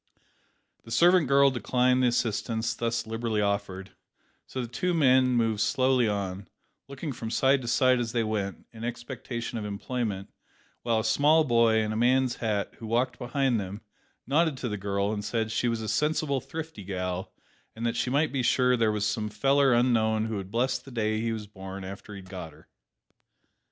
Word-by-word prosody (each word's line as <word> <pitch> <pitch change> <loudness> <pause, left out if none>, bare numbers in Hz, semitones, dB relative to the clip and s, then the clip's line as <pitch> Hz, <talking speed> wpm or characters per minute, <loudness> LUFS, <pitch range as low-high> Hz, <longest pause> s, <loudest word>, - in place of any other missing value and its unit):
The - - -14
servant 175 +6 +4
girl 140 +1 +5
declined 125 0 +2
the 125 - +4
assistance 115 -1 -1
thus 115 -1 -2
liberally 115 -1 -2
offered, 100 -2 -2 0.6
so 130 - -6
the 120 - -2
two 175 +9 -1
men 130 -4 +5
moved 115 -3 +1
slowly 125 +3 +2
on, 100 -2 -3 0.4
looking 140 +2 -5
from 115 -2 -6
side 135 +3 +3
to 120 - -7
side 130 +1 +3
as 115 -2 -2
they 115 -1 +1
went, 105 -3 -3
in 110 0 -9
expectation 120 0 -5
of - - -5
employment, 105 -1 -4 0.5
while 115 -2 +1
a - - -6
small 150 +7 +4
boy, 115 -4 +3
in 110 - -2
a - - -3
man's 125 +2 +2
hat, 105 -3 -2
who 115 - -7
walked 120 +3 0
behind 125 -1 0
them, 100 +2 -6 0.4
nodded 155 +1 +2
to 125 -2 -3
the 105 - -2
girl, 100 +1 -1
and 105 -1 -4
said 110 +1 -2
she 115 +2 0
was 115 -1 -1
a 110 - -4
"sensible 145 +3 0
thrifty 160 -9 -7
gal," 90 -1 -4 0.4
and 115 +1 -4
that 115 0 0
she 120 - -1
might 145 +4 +1
be 135 - -1
sure 125 +1 +3
there 115 -2 +2
was 105 -1 -1
"some 110 0 -1
feller 135 +4 +3
unknown 110 -3 +2
who 110 -2 -3
would 95 -1 -6
bless 125 +5 0
the - - -14
day 110 -3 -1
he 115 0 -1
was 110 -2 -4
born 95 -1 -8
after 100 +2 -8
he'd 95 -2 -10
got 90 -4 -8
her." - - -20
115 Hz, 190 wpm, -27 LUFS, 105-130 Hz, 0.6 s, girl